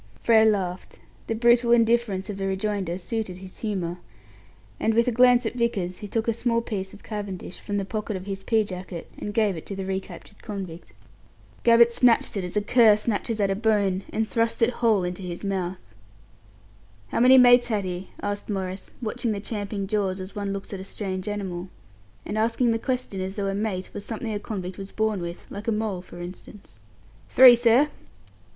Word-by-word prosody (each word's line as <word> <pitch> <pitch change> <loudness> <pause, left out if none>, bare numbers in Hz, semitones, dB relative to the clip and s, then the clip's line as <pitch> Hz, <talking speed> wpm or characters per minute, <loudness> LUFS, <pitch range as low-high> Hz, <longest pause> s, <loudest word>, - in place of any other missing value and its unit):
Frere 220 -1 +5
laughed. 190 -4 -1 0.3
The 225 - -1
brutal 235 +1 +4
indifference 230 -4 +2
of 205 -2 -5
the 195 0 -2
rejoinder 190 -2 -2
suited 190 -1 -4
his 185 0 -10
humour, 180 -5 -3 0.8
and, 225 - +1
with 235 +1 +3
a - - +3
glance 245 +1 +5
at - - -1
Vickers, 210 -7 -1
he 205 - -6
took 225 +2 -2
a 230 - +2
small 230 +1 0
piece 195 -5 -4
of 205 - -14
cavendish 200 -4 -6
from 205 - -3
the 195 - -1
pocket 215 +1 -3
of 185 0 -6
his 195 -1 -5
pea 220 +1 +2
jacket, 180 -3 -7
and 210 - -4
gave 210 -3 +1
it 160 - -7
to 200 - -5
the 190 0 -4
recaptured 190 +1 -6
convict. 190 -6 -7 0.7
Gabbett 235 0 +6
snatched 235 -2 +3
it 195 - -2
as 180 +3 -4
a 205 - +1
cur 225 -1 +6
snatches 220 +1 -2
at 200 -1 +2
a - - +1
bone, 200 -3 +1
and 220 0 -1
thrust 230 +1 +1
it 230 - +4
whole 225 -6 +2
into 180 +1 -4
his 180 +1 -6
mouth. 190 -2 -2 1.3
"How - - -1
many 255 +2 +7
mates 245 -1 +7
had 210 -4 -1
he?" 180 +1 -5
asked 205 +1 -3
Maurice, 190 -2 -4
watching 230 0 -1
the 200 - -3
champing 205 -1 -4
jaws 195 -2 -1
as 185 +1 -8
one 200 -1 -3
looks 200 +1 -6
at 195 - -5
a - - -6
strange 190 -1 -5
animal, 190 -3 -4 0.6
and 215 - -2
asking 230 +2 +2
the 225 - 0
question 250 -6 -3
as 190 +1 -4
though 200 - -2
a 195 - -1
"mate" 195 -2 -3
was 205 - -6
something 225 0 -4
a 205 - -2
convict 190 -3 -6
was 195 0 -7
born 220 -3 0
with 170 0 -6
like 205 +3 -7
a - - +2
mole, 210 -4 -2
for 175 - -12
instance. 185 +3 -11 0.5
"Three, 255 -2 +9
sir." 240 +5 +4
205 Hz, 200 wpm, -25 LUFS, 190-225 Hz, 1.3 s, Three